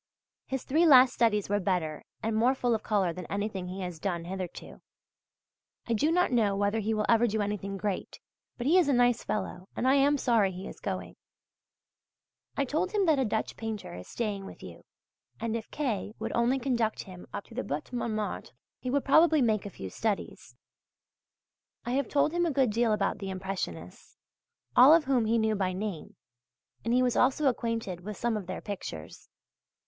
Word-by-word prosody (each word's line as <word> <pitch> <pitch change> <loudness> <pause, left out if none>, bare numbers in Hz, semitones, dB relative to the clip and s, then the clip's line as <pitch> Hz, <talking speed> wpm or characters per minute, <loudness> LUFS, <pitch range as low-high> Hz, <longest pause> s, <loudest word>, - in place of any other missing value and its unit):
His 265 -1 -3
three 325 +5 +3
last 255 -3 +8
studies 210 -4 +2
were 205 +1 +1
better 175 -6 -1 0.2
and 220 0 0
more 245 +4 +3
full 245 -2 +1
of 220 - 0
colour 195 -6 +1
than 180 +1 -8
anything 200 -2 -3
he 185 +2 -6
has 180 -3 -5
done 170 -2 -2
hitherto. 185 -1 -7 1.0
I 235 - -1
do 295 +8 +2
not 360 -2 +2
know 215 -5 +2
whether 205 +2 +1
he 220 +1 -1
will 215 -1 0
ever 235 +1 +4
do 220 0 -1
anything 200 -1 -2
great, 200 -1 -4 0.4
but 240 - -4
he 340 +7 +5
is 325 -5 +2
a - - +4
nice 245 -1 +3
fellow, 185 -3 -4
and 255 - 0
I 265 - +5
am 280 +1 +4
sorry 225 -7 +2
he 185 +2 -7
is - - -10
going. - - -5 1.4
I 280 - +2
told 330 - -1
him 405 -2 +2
that 310 -5 +3
a 265 - +2
Dutch 220 0 -2
painter 220 - -5
is 90 +1 -9
staying 205 -4 -3
with - - -12
you, - - -11 0.5
and 230 0 -2
if 225 -1 -5
K. 225 -7 -3
would - - -4
only 235 +3 +2
conduct 240 -4 -1
him 185 -2 -11
up - - -5
to - - -15
the 255 - -3
Butte 150 - -5
Montmartre, 215 -3 -3 0.3
he 255 - -4
would 280 +2 0
probably 315 0 +5
make 215 -3 +1
a - - -6
few 95 - -8
studies. 215 -3 -3 1.3
I 240 - -2
have 275 +2 0
told 290 +1 +2
him 345 0 +1
a - - 0
good 265 -4 +2
deal 230 +1 +2
about 210 - 0
the 195 - -5
Impressionists, 185 - -6 0.6
all 270 +6 +9
of 330 -2 +2
whom 255 -4 +2
he 225 +2 +2
knew 220 -1 +2
by 190 -3 -1
name, 190 -3 -5 0.7
and 230 - -1
he 250 +1 +4
was 250 -1 +1
also 270 +4 +3
acquainted 230 -8 -1
with 210 +2 -7
some 235 -1 0
of 200 -4 -5
their 185 - -5
pictures. 130 - -7
220 Hz, 195 wpm, -29 LUFS, 195-255 Hz, 1.4 s, all